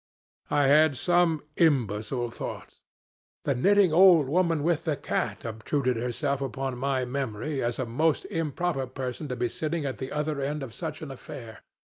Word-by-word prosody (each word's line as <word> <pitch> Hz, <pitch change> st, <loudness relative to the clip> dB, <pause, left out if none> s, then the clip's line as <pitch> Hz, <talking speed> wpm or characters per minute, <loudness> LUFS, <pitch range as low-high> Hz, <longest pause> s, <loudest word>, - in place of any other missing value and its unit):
I 145 Hz, -, +3 dB
had 150 Hz, 0 st, +5 dB
some 175 Hz, -2 st, +2 dB
imbecile 120 Hz, -, +1 dB
thoughts. -, -, -7 dB, 0.6 s
The 140 Hz, -, +1 dB
knitting 190 Hz, +6 st, +4 dB
old 170 Hz, -4 st, +7 dB
woman 165 Hz, 0 st, +1 dB
with 165 Hz, -1 st, +1 dB
the 155 Hz, -4 st, 0 dB
cat 140 Hz, -, -2 dB
obtruded 125 Hz, +4 st, -1 dB
herself 130 Hz, +4 st, -1 dB
upon 135 Hz, -1 st, -3 dB
my 130 Hz, -1 st, 0 dB
memory 135 Hz, +2 st, -3 dB
as 120 Hz, 0 st, -1 dB
a 130 Hz, -, -1 dB
most 150 Hz, +7 st, +1 dB
improper 160 Hz, -3 st, -2 dB
person 130 Hz, +3 st, -5 dB
to 125 Hz, -, -3 dB
be 120 Hz, 0 st, 0 dB
sitting 155 Hz, +5 st, -3 dB
at 130 Hz, -6 st, -4 dB
the 130 Hz, -, -5 dB
other 150 Hz, -1 st, -2 dB
end 145 Hz, +1 st, -2 dB
of 120 Hz, -4 st, -8 dB
such 155 Hz, 0 st, -5 dB
an 145 Hz, -, -6 dB
affair. 115 Hz, -3 st, -9 dB
140 Hz, 165 wpm, -27 LUFS, 125-155 Hz, 0.6 s, old